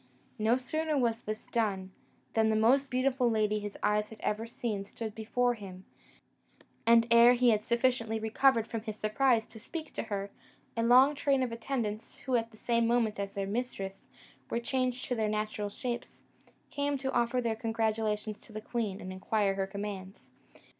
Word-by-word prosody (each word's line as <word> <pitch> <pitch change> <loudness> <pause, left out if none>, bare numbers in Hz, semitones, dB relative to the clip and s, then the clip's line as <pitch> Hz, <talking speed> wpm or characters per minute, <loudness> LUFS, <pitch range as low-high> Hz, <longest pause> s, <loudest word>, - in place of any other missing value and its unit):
No 225 +3 +3
sooner 310 +4 -1
was 235 -3 +1
this 215 -1 -5
done, 195 -5 -1 0.4
than 220 -1 +3
the 220 - +2
most 260 +6 +4
beautiful 255 -1 +2
lady 215 -1 +1
his 205 -1 -6
eyes 210 0 +2
had 220 - -12
ever 220 +2 -1
seen 225 -4 -3
stood 215 +2 -6
before 245 +3 +1
him: 190 -4 -10 1.0
and 230 0 +7
ere 235 +1 +8
he 245 -1 +4
had 210 -1 +1
sufficiently 235 -2 +1
recovered 225 +2 +3
from 225 -1 -4
his 215 -1 -5
surprise 225 +2 +2
to 220 - -13
speak 315 +7 -7
to - - -2
her, 200 -2 -4 0.4
a 230 - 0
long 255 +5 +6
train 275 -2 +1
of 245 - -2
attendants, 230 -2 -3
who, 260 -1 +1
at 230 -1 +1
the 220 - -18
same 235 0 +1
moment 230 -3 +1
as 200 0 -4
their 200 -1 -1
mistress, 195 -3 -4 0.4
were 235 - 0
changed 255 +1 -1
to - - -2
their 220 -3 0
natural 215 -1 -2
shapes, 240 +3 -5 0.5
came 285 0 0
to 265 0 -2
offer 240 +1 +2
their 230 -2 0
congratulations 220 -1 -1
to - - -16
the 215 - -5
queen, 215 -3 -3
and 185 0 -6
inquire 195 +1 +1
her 195 0 -2
commands. 195 -1 -7
225 Hz, 180 wpm, -31 LUFS, 210-245 Hz, 1.0 s, ere